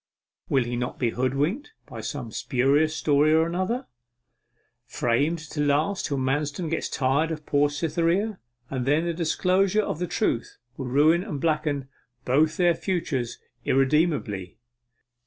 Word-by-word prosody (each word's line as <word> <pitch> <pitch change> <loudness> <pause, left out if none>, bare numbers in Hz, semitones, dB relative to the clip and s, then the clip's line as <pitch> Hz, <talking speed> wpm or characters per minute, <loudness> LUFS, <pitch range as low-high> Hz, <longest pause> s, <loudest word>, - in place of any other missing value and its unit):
Will 135 -2 +3
he 120 +1 -4
not 125 +1 -3
be 120 -3 0
hoodwinked 145 - -1
by - - -8
some 125 -6 -5
specious 140 +8 +1
story 150 +1 +3
or 160 0 +4
another, 185 +10 -2 1.0
framed 135 +7 +1
to 150 - -2
last 150 +7 +1
till 140 - -2
Manston 145 +5 -1
gets 165 - -1
tired 140 +5 +1
of 155 -2 -5
poor 145 0 +2
Cytherea? 170 +7 0 0.3
And 130 -2 -2
then 150 +4 +3
the 170 - -1
disclosure 185 +5 +2
of 160 - -3
the 180 - -1
truth 165 - -1 0.2
will 130 - -5
ruin 155 +7 +4
and 190 -9 -5
blacken 150 -3 0 0.4
both 155 +5 +2
their 175 -1 +4
futures 160 - -2 0.3
irremediably. 135 - +1
150 Hz, 140 wpm, -25 LUFS, 135-170 Hz, 1.0 s, or